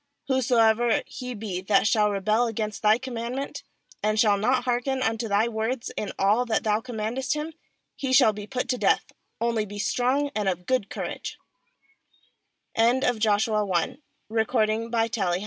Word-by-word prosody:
"Whosoever 240 -3 +3
he 250 -1 -7
be 200 -4 -4
that 195 +2 +3
shall 215 -1 +3
rebel 215 +4 +1
against 215 -2 -3
thy 215 +1 +5
com 260 0 -7
mandment, 240 +4 -4 0.4
and 215 0 +1
shall 210 -2 +5
not 245 +5 +1
hearken 255 +2 0
unto 225 0 -1
thy 210 +2 +2
words 230 +2 -2
in 210 - -3
all 210 +5 +3
that 220 - +1
thou 215 0 +1
com 245 -1 -8
mandest 250 +6 -1
hi™, 305 +2 -4 0.4
he 265 -2 -3
shall 255 -4 +6
be 205 0 -8
put 250 0 -3
to 250 -1 0
death; - - +2 0.3
only 230 -2 +1
be 205 0 -8
strong 250 +8 0
and 210 -2 +1
of 180 -1 -4
good 255 -4 0
courag - - -5
225 Hz, 145 wpm, -26 LUFS, 210-250 Hz, 0.4 s, shall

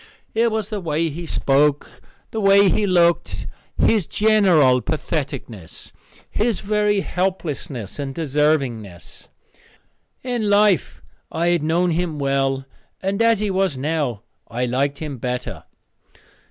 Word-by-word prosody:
It 230 +1 +2
was 215 -2 -2
the 210 -2 -3
way 165 0 0
he 165 +3 -7
spoke, 145 +1 +1 0.3
the 220 - -3
way 195 0 +6
he 210 +1 +1
looked, 170 -2 +2 0.3
his 210 -7 +2
general 180 -12 +4
patheticness, 140 - -5 0.4
his 220 -1 -1
very 210 0 +1
helplessness, 155 - -3
and 135 -1 -4
deservingness. 135 - -1 1.0
In 240 -4 -1
life 205 -5 +2 0.3
I 170 +2 0
had 175 -2 +2
known 170 +3 +1
him 165 -2 -1
well, 135 -1 0 0.4
and 195 +3 -1
as 230 -2 +3
he 210 -2 0
was 190 -6 0
now 140 -6 -2 0.2
I 125 +2 -2
liked 135 +3 0
him 145 -4 -6
better. 125 +1 -4
160 Hz, 125 wpm, -21 LUFS, 135-200 Hz, 1.0 s, way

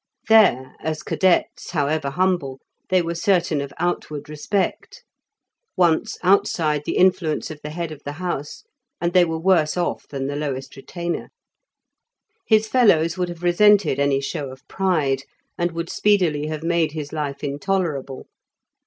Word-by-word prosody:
There 195 - +4
as 155 -1 -4
cadets, 185 -2 +1
however 150 -2 0
humble, 170 -5 0 0.3
they 185 -1 +3
were 170 0 -2
certain 170 -5 +1
of 140 -1 -6
outward 155 -3 -3
respect: 195 - -3 0.7
once 170 -3 +2
outside 160 -5 +2
the - - -1
influence 175 -5 +2
of 155 - -9
the 150 - -6
head 165 +1 -4
of 150 -2 -9
the 145 - -5
house, 155 -3 -5 0.4
and 170 0 -1
they 180 -1 +6
were 165 -1 -1
worse 165 -2 +2
off 175 - -2
than 135 -2 -4
the 140 +1 -3
lowest 135 -2 -4
retainer. 170 +5 -5 1.2
His 220 -1 +4
fellows 170 -10 +3
would 180 -1 -2
have 175 0 -9
resented 180 -4 +4
any 140 -1 +2
show 140 0 -4
of 130 +2 -13
pride, 155 -9 0 0.3
and 175 0 0
would 165 0 -4
speedily 175 -8 +2
have 155 0 -5
made 165 -2 +1
his 150 -2 -6
life 145 -3 -4
intolerable. 145 -3 -2
160 Hz, 150 wpm, -22 LUFS, 145-180 Hz, 1.2 s, they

